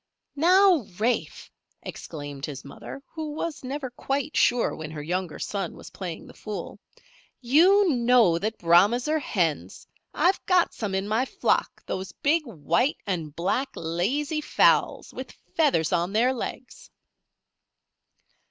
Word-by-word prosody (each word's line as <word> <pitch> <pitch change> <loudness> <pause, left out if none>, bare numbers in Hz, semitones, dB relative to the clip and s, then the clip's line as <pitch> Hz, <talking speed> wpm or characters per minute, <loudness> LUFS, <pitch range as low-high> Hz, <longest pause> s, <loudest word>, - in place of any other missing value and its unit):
"Now, 355 - +5
Rafe!" 235 +3 -1 0.3
exclaimed 145 -3 -7
his 140 -2 -8
mother, 270 - -9
who 315 -2 -6
was 315 -1 -4
never 265 0 -4
quite 275 +4 -3
sure 240 -1 +3
when 155 -1 -7
her 155 -2 -7
younger 180 +1 -3
son 195 -4 -4
was - - -12
playing 180 -4 -6
the - - -13
fool. 210 -1 -7 0.6
"You 355 +11 +5
know 235 -8 +4
that 215 +4 -3
Brahmas 195 - +4
are 310 +1 +1
hens. 175 - -2 0.3
I've 370 +2 +1
got 365 -2 +3
some 205 -4 -3
in 190 +1 -1
my 220 +5 +1
flock - - -1
those 190 0 -5
big 305 0 +1
white 205 - 0
and 165 -6 -3
black, 200 +11 0
lazy 255 - -1
fowls, - - +2
with - - -8 0.2
feathers 275 - +2
on 175 +2 0
their 245 +4 +3
legs." 255 - -7
230 Hz, 135 wpm, -26 LUFS, 175-290 Hz, 0.6 s, Now